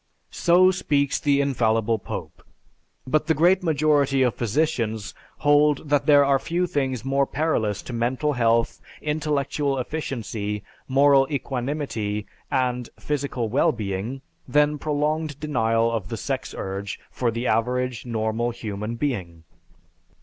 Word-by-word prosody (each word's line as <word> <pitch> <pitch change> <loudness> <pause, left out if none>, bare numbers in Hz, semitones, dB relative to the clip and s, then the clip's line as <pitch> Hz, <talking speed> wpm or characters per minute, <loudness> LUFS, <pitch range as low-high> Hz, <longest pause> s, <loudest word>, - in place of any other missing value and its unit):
So 180 +2 +5
speaks 140 -6 0
the 140 -2 +2
infallible 115 -5 +1
Pope, - - -7 0.6
but 150 +5 +1
the 160 - +3
great 180 +4 +4
majority 145 -4 +2
of 125 -3 +2
physicians 115 -3 -1 0.2
hold 145 0 +3
that 145 -1 +2
there 145 -1 +7
are 140 -1 +3
few 175 +5 -1
things 135 -6 -2
more 135 0 +2
perilous 120 -9 -1
to 125 - -7
mental 130 +6 0
health, 115 -2 +1 0.2
intellectual 145 -2 -1
efficiency, 115 -7 -4 0.2
moral 135 0 +5
equanimity, 125 -7 -3 0.2
and 125 -2 0
physical 140 -5 -2
well 125 +6 +3
being 110 +4 -4 0.3
than 150 0 +2
prolonged 150 0 -1
denial 115 -6 +1
of 110 -4 -3
the 115 - -4
sex 95 - -4
urge 95 0 -4
for 125 - 0
the 115 +2 -3
average, 125 +2 0
normal 115 0 -1
human 110 -1 -5
being. 95 - -3
130 Hz, 130 wpm, -24 LUFS, 115-145 Hz, 0.6 s, there